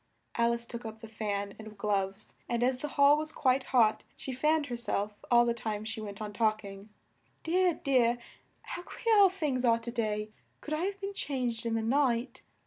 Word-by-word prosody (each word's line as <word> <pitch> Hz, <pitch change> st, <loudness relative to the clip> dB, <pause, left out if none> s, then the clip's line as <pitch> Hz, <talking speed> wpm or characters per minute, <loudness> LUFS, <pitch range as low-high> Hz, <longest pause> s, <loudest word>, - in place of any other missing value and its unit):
Al 235 Hz, 0 st, +3 dB
ice 235 Hz, 0 st, -3 dB
took 235 Hz, 0 st, -7 dB
up 220 Hz, -1 st, -7 dB
the 225 Hz, -, -9 dB
fan 205 Hz, -2 st, -3 dB
and 215 Hz, -1 st, -10 dB
gloves 195 Hz, 0 st, -1 dB, 0.2 s
and 235 Hz, 0 st, +1 dB
as 255 Hz, +1 st, +2 dB
the 295 Hz, -, -3 dB
hall 285 Hz, +1 st, +7 dB
was 310 Hz, 0 st, -3 dB
quite 260 Hz, -2 st, +2 dB
hot, 225 Hz, -5 st, +3 dB
she 265 Hz, -, -5 dB
fanned 300 Hz, +4 st, +2 dB
her 245 Hz, -, -4 dB
self 210 Hz, -3 st, -2 dB, 0.2 s
all 240 Hz, 0 st, +6 dB
the 235 Hz, -, +2 dB
time 215 Hz, -2 st, -4 dB
she 225 Hz, 0 st, -4 dB
went 200 Hz, -2 st, -7 dB
on 210 Hz, -1 st, -5 dB
talk 215 Hz, 0 st, +1 dB
ing. 195 Hz, +1 st, -10 dB, 0.5 s
"Dear, 355 Hz, +1 st, +2 dB
dear! 245 Hz, -3 st, +3 dB, 0.5 s
How -, -, -5 dB
queer 450 Hz, +5 st, 0 dB
all 395 Hz, -1 st, +8 dB
things 295 Hz, -9 st, -1 dB
are 230 Hz, -2 st, +5 dB
to 230 Hz, +1 st, -5 dB
day! 215 Hz, -2 st, -2 dB, 0.3 s
Could 305 Hz, -, -5 dB
I 315 Hz, +4 st, 0 dB
have 395 Hz, 0 st, -3 dB
been 400 Hz, 0 st, -4 dB
changed 250 Hz, -, -2 dB
in 225 Hz, -, 0 dB
the 225 Hz, -, 0 dB
night? 245 Hz, 0 st, +1 dB
235 Hz, 210 wpm, -30 LUFS, 215-280 Hz, 0.5 s, all